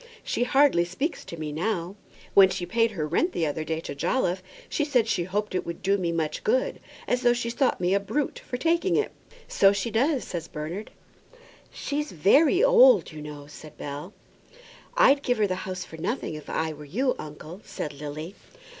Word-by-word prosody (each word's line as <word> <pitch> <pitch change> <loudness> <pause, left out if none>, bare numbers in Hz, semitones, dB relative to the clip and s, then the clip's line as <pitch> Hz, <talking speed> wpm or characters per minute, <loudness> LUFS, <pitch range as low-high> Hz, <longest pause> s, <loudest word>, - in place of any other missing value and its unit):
"She 245 - 0
hardly 270 -9 +4
speaks 225 - -3
to 170 - -8
me 155 -1 -4
now. 175 +2 -2 0.4
When 195 -1 +8
she 175 - -3
paid 230 +5 +2
her 155 -5 -2
rent 335 - +1
the 165 - 0
other 155 +1 -2
day 160 0 -2
to - - -6
Jolliffe, 180 - 0 0.3
she 300 - -1
said 250 -6 +2
she 175 -5 0
hoped 205 +3 -2
it 185 - 0
would 170 0 -7
do 195 +1 +3
me 180 -4 -1
much 160 -2 -2
good; 485 +3 +1 0.3
as 250 - +1
though 240 -1 +4
she 235 -1 -2
thought 260 +2 +1
me 180 +1 +1
a 200 - +4
brute 280 +8 -2
for 245 - -5
taking 335 +5 +1
it." 430 - +1 0.4
"So 195 - +5
she 200 +3 -2
does," 265 +5 +1
said 170 -3 -6
Bernard. 165 +8 -5 0.8
"She's 295 +1 -3
very 290 - +4
old, - - +6
you 155 -1 -9
know," 150 -1 -8
said 150 +1 -13
Bell. 145 +6 -6 0.9
"I'd 275 +1 +6
give 245 -3 0
her 215 - +3
the 185 - -1 0.2
house 185 -1 -4
for 160 - -11
nothing, 220 +2 -3
if 150 -1 -9
I 160 0 -1
were 150 0 -11
you, 250 - 0
uncle," 155 +5 -9
said 150 - -5
Lily. 150 +5 -7
190 Hz, 200 wpm, -26 LUFS, 160-255 Hz, 0.9 s, When